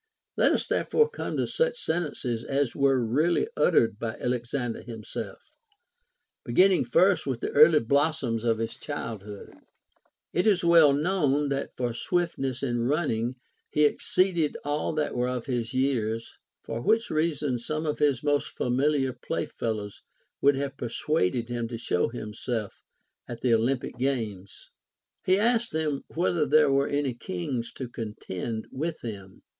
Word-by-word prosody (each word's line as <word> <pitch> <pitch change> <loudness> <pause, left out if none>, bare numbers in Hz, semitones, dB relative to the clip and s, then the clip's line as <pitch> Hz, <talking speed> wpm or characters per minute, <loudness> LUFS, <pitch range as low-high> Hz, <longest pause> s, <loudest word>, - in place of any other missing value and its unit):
Let - - +4
us - - 0
therefore 455 0 +2
come - - -4
to - - +1
such 485 0 0
sentences 145 - -2
as 135 -1 -1
were 135 -3 +3
really 155 - +2
uttered 115 -2 +3
by 115 0 -3
Alexander 125 0 -2
him 115 -3 -9
self, - - -6 1.1
beginning 185 -5 +4
first 185 +8 +3
with 130 -3 -1
the - - -2
early 155 +1 +7
blossoms 140 -2 +1
of 115 -2 +2
his 115 0 -4
childhood. 105 -8 -7 0.8
It 180 +5 +2
is 195 -5 +3
well 165 -4 +7
known 145 -2 +1
that 140 0 -3
for 120 -2 -1
swiftness 135 -3 -1
in 120 -3 0
running 130 -5 0 0.3
he 150 - +3
ex 145 - -1
ceeded 175 -5 +2
all 145 +1 -1
that 155 -1 -1
were 125 0 0
of 125 -2 -3
his 120 -4 -2
years; 120 -4 -1 0.3
for 115 +1 -4
Avhich 225 - +2
reason 150 -5 0
some 155 +6 -3
of 150 - -2
his 145 -4 +2
most 145 -1 +1
familiar 135 +1 +1
play 125 - -3
fellows 105 -3 -4 0.4
would 140 0 +5
have 140 0 -3
persuaded 120 - 0
him 120 -1 -2
to 115 0 -5
show 90 -6 0
himself 110 -1 -5 0.5
at 120 -1 -7
the 125 -2 +3
Olympic 125 +3 0
games. 110 -8 -3 0.5
He 185 +1 +3
asked 230 +2 +2
them 155 -3 -1
whether 170 -2 +1
there 150 0 +5
were 140 +1 +2
any 145 -3 0
kings 115 +3 -4
to 130 - -6
contend 110 -1 -5
with 160 +4 -3
him. 100 -5 -8
135 Hz, 150 wpm, -27 LUFS, 115-155 Hz, 1.1 s, early